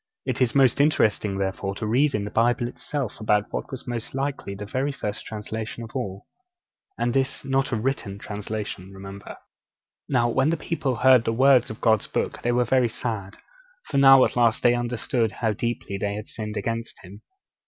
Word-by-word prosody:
It - - -2
is 125 0 +2
most 135 0 +5
interesting, 105 -9 +2
therefore, 95 0 -2
to 110 - -4
read 130 +6 +2
in 105 - -1
the 105 - -6
Bible 120 +1 +2
itself 130 -1 -5
about 105 -1 +1
what - - -3
was 130 - -7
most 120 0 -4
likely 135 -7 -3
the 105 +1 -6
very 130 +7 -1
first 105 -6 -5
translation 110 +2 -5
of 115 - -9
all 100 -6 -4 0.7
and 120 0 0
this 135 0 0
not 135 0 +1
a - - +1
written 110 -4 -2
translation, 105 -2 -6
remember. 100 +1 -9 0.7
Now 120 -3 +3
when 130 +5 +2
the 165 - +1
people 145 -5 -2
heard 125 0 +5
the 115 - 0
words 130 +1 +4
of 110 - -8
God's 110 -2 +3
Book - - -2
they 120 - +1
were 120 0 +2
very 125 0 +3
sad; 110 -4 -5 0.5
for 140 - +1
now 135 -1 +8
at - - -3
last 115 -2 +2
they 120 - +6
understood 120 -1 -1
how 110 -2 0
deeply 110 -3 -3
they 100 +1 -1
had 105 +1 -7
sinned 105 -1 -5
against 115 +2 -3
Him. 95 +3 -12
115 Hz, 190 wpm, -25 LUFS, 105-130 Hz, 0.7 s, now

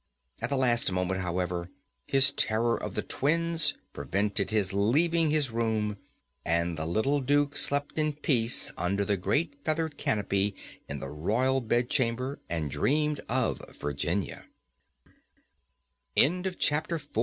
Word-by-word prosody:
At - - -2
the 140 - 0
last 120 -5 +2
moment, 90 +1 -1
however, 90 -1 -2 0.4
his 135 0 +6
terror 115 -2 +1
of - - -6
the - - -1
twins 165 +2 +1 0.2
prevented 100 +7 -1
his 105 -3 0
leaving 155 - +2
his 150 -4 +2
room, 110 -2 -1 0.5
and 85 +1 0
the 80 0 -4
little 120 - +1
Duke 145 +2 +1
slept 145 +2 +2
in 155 -1 +1
peace 125 -5 +2
under 100 +3 0
the 100 - +1
great 140 - -1
feathered 160 -1 -2
canopy 100 -1 0 0.3
in 70 -1 -5
the - - -5
Royal 120 - 0
Bedchamber, 120 +2 0
and 80 -4 -2
dreamed 150 - +1
of 125 0 0
115 Hz, 120 wpm, -28 LUFS, 95-145 Hz, 0.5 s, his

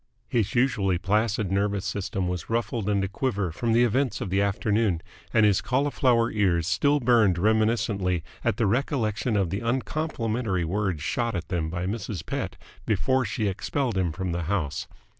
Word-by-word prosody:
His 110 -2 0
usually 115 -7 +2
placid 105 +2 0
nervous 100 0 0
system 95 -2 -2
was 90 -2 -4
ruffled 115 -2 -1
and 100 -1 +1
a - - 0
quiver 100 -3 -1
from 115 +8 -1
the 115 +2 +5
events 125 +1 +1
of 95 - -4
the 100 +1 +2
afternoon, 100 -2 +1 0.3
and 110 - +4
his 100 -2 +3
cauliflower 125 -3 +2
ears 90 -6 +2
still 140 - +2
burned 115 -7 +4
reminiscently 105 -3 +1 0.2
at - - +1
the 115 - +2
recollection 115 -1 0
of 95 -4 0
the 100 - -1
uncomplimentary 115 - -1
words 95 -3 -1
shot 115 +5 -1
at 85 -2 -4
them 85 -3 -1
by 90 +2 -3
Mrs. 100 -4 -4
Pett - - -4 0.3
before 130 +5 +2
she 105 +1 -1
expelled 120 +5 -1
him 90 -3 +1
from 90 +3 -3
the 85 -1 -2
house. 85 -5 -2
105 Hz, 170 wpm, -26 LUFS, 95-115 Hz, 0.3 s, the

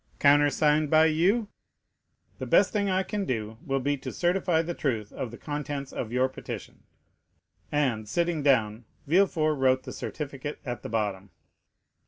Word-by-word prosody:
"Countersigned 145 +1 +4
by 155 +1 +6
you?" 185 +8 +2 0.9
"The - - -4
best - - +4
thing 205 -2 +1
I 190 0 +1
can 205 +1 -3
do 110 - -3
will 135 0 -1
be 145 +2 0
to 130 - -6
certify 175 -2 +1
the 175 +1 -3
truth 115 -10 -2
of 125 - -4
the 120 - -10
contents 145 -2 -5
of 115 - -4
your 125 +1 +2
petition." 130 - -8 0.9
And, 125 -8 0
sitting 170 +3 0
down, 115 -5 +2 0.2
Villefort 155 -3 +2
wrote 130 0 +3
the - - -7
certificate 145 -1 -6
at 120 -2 -4
the - - -7
bottom. 100 -3 -2
145 Hz, 155 wpm, -27 LUFS, 125-160 Hz, 0.9 s, by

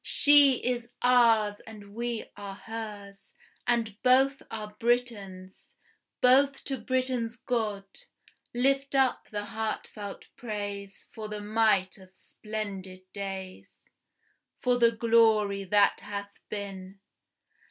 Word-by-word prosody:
She 290 -2 +6
is 240 -1 -1
ours, 230 -4 +4
and 205 -2 -12
we 235 0 -3
are 200 -1 -8
hers, 205 -2 -9 0.3
And 230 -3 0
both 265 +2 +4
are 210 -1 -7
Britain's. 205 -6 -2 0.5
Both 270 +2 +4
to 270 -1 -4
Britain's 255 -3 -1
God 215 -6 -2 0.7
Lift 275 +3 +1
up 265 -2 +2
the 205 -1 -4
heart 220 0 -3
felt 205 -2 -9
praise 205 -3 -6
for 220 -2 -6
the 210 0 -5
might 210 -2 +1
of 190 -1 -16
splendid 195 -4 -7
days, 195 -2 -7 0.7
For 245 -1 +1
the 235 -1 +5
glory 220 -4 +3
that 200 +1 +3
hath 200 0 -6 0.2
been. 195 -2 -7
215 Hz, 110 wpm, -28 LUFS, 200-240 Hz, 0.7 s, She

